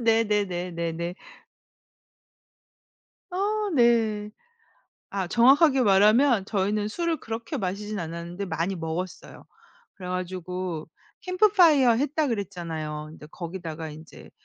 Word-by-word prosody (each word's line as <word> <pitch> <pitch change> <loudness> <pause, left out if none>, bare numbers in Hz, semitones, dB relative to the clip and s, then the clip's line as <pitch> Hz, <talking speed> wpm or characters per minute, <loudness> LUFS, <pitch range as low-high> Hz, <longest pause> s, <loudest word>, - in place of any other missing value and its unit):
네네네네네. 180 -7 0 2.2
아 415 +3 -1
네. 225 -4 +3 0.8
아 195 -2 -2
정확하게 265 - +5
말하면 215 +3 +4
저희는 205 +1 0
술을 335 +7 -1
그렇게 230 +5 -5
마시진 205 0 -3
않았는데 170 +3 -5
많이 170 +3 -2
먹었어요. 170 +2 -6 0.5
그래가지고 180 -2 -4 0.3
캠프파이어 365 - +5
했다 290 +5 0
그랬잖아요. 165 - -4
근데 150 -1 -12
거기다가 165 -2 -6
인제 155 +2 -13
200 Hz, 255 characters per minute, -26 LUFS, 175-235 Hz, 2.2 s, 정확하게